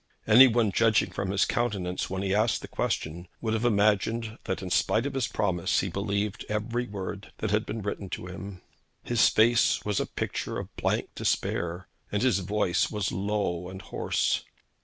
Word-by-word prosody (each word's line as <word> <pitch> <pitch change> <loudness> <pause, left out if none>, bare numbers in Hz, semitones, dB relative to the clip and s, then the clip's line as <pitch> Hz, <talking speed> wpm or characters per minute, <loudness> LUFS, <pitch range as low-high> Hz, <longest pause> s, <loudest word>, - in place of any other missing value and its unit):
Any 120 +5 +9
one 115 -3 +2
judging 115 +2 +3
from 100 -1 -3
his 100 +1 +2
countenance 100 -7 -1
when 95 +1 -3
he 95 -1 0
asked 110 +3 +2
the - - -6
question 85 +3 -3
would 110 -2 -1
have 110 +1 0
imagined 110 +1 +1
that 95 - -3
in 90 - -5
spite 110 +6 +2
of 140 - -2
his 130 -3 0
promise 90 -4 0
he 95 - -2
believed 100 +2 -2
every 115 +3 -1
word 100 0 -6
that 110 - -2
had 105 +1 +1
been 110 -1 -4
written 100 -1 -4
to 90 - -5
him. 95 +1 -8 0.4
His 120 -2 +4
face 115 +2 +3
was 105 -2 0
a - - -1
picture - - -3
of - - -7
blank - - 0
despair, 85 +2 -1 0.2
and 105 +2 0
his 125 -7 +3
voice 95 -1 +1
was 105 -3 -2
low 95 -3 -1
and 95 0 -8
hoarse. 95 - -1
105 Hz, 180 wpm, -28 LUFS, 95-110 Hz, 0.4 s, Any